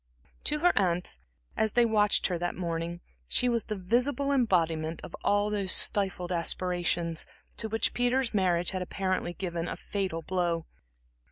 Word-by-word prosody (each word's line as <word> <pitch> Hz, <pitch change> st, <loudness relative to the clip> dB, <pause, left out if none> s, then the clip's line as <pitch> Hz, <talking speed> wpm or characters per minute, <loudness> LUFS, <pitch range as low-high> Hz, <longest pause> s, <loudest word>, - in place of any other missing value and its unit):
To 300 Hz, 0 st, 0 dB
her 355 Hz, +1 st, +5 dB
aunts, 180 Hz, -, +2 dB, 0.4 s
as 220 Hz, -1 st, +1 dB
they 240 Hz, 0 st, +5 dB
watched 210 Hz, -2 st, +3 dB
her 175 Hz, -3 st, 0 dB
that 175 Hz, 0 st, -2 dB
morning, 170 Hz, -1 st, -3 dB, 0.3 s
she 250 Hz, -, +2 dB
was 235 Hz, -2 st, +1 dB
the 215 Hz, -, -3 dB
visible 250 Hz, +9 st, +1 dB
embodiment 165 Hz, -, +1 dB
of -, -, -7 dB
all 205 Hz, +1 st, +2 dB
those 200 Hz, -3 st, 0 dB
stifled 190 Hz, -3 st, +2 dB
aspirations, 175 Hz, -1 st, 0 dB, 0.3 s
to 220 Hz, -, -4 dB
which 225 Hz, +1 st, +1 dB
Peter's 245 Hz, 0 st, +1 dB
marriage 180 Hz, -3 st, +2 dB
had 185 Hz, -1 st, -3 dB
apparently 185 Hz, -1 st, -2 dB
given 175 Hz, -2 st, -3 dB
a -, -, -4 dB
fatal 185 Hz, -5 st, -3 dB
blow. 175 Hz, -2 st, -1 dB
185 Hz, 155 wpm, -29 LUFS, 175-220 Hz, 0.4 s, her